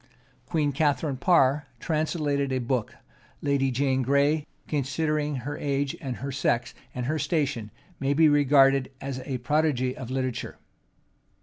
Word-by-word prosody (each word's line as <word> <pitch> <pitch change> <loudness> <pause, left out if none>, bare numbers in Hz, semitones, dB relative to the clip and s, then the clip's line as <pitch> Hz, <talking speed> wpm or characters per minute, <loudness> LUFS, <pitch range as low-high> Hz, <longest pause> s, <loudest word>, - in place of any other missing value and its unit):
Queen 150 -4 +1
Catharine 145 -1 0
Parr 145 -3 +3
translated 150 -3 -1
a 130 - +1
book: 125 -2 -2 0.4
Lady 140 -2 +1
Jane 130 +1 +1
Gray, 140 +4 +2 0.2
considering 150 +1 -1
her 140 +3 -5
age, 140 -1 -1
and 130 -3 -4
her 140 +3 -5
sex, 125 -2 0 0.2
and 125 -1 -3
her 155 +4 -1
station, 140 - -1 0.3
may 140 +1 +1
be 160 +1 +6
regarded 140 -2 +4
as 135 -1 -5
a 135 -3 -2
prodigy 130 -1 +1
of 125 - -7
literature. 130 -2 -3
140 Hz, 135 wpm, -26 LUFS, 130-150 Hz, 0.4 s, be